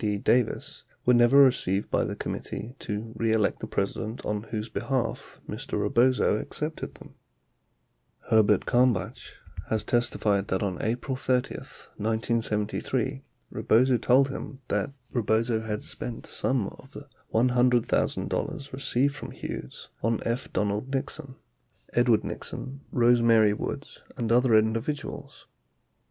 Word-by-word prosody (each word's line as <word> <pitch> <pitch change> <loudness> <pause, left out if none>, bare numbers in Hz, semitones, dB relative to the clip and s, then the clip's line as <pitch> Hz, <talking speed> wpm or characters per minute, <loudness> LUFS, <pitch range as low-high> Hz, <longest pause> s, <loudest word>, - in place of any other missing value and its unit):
D. 105 -2 0
Davis 120 +3 0 0.2
were 125 - +5
never 120 +3 +6
received 125 -8 +4
by - - +2
the - - -3
Committee 120 +3 -5
To 110 +1 -5
Re 115 0 +1
Elect 110 -2 +1
the - - -5
President 110 +4 -3
on 105 -1 -1
whose 110 -1 -3
behalf 130 +2 -3
Mr. - - -4
Rebozo 125 -3 +3
accepted 155 +6 -5
them. - - -14 1.1
39 - - -15
Herbert 105 -2 +4
Kalmbach 120 -5 +1 0.3
has 110 -1 0
testified 105 -4 +1
that 95 +2 0
on 95 -3 -2
April 125 +4 -1
30, 125 -1 0
1973, 115 +4 -2 0.3
Rebozo 125 +2 +3
told 130 +4 +4
him 135 0 -6
that 105 +5 0 0.2
Rebozo 115 0 +1
had 110 -1 -4
spent 120 -2 -6
some 130 -6 -1
of 135 - -16
the 145 - -9 0.3
$100,000 125 +4 +1
received 135 +1 +1
from 150 - -7
Hughes 65 - -7
on 115 +1 +1
F. 120 +3 -2
Donald 105 +5 -1
Nixon, 135 0 -4 0.6
Edward 120 -3 +4
Nixon, 135 +1 -6
Rose 120 -1 +4
Mary 110 -3 +5
Woods, - - -5 0.2
and 115 -1 -1
other 120 -1 +5
individuals. 115 +7 -1
115 Hz, 130 wpm, -27 LUFS, 110-130 Hz, 1.1 s, never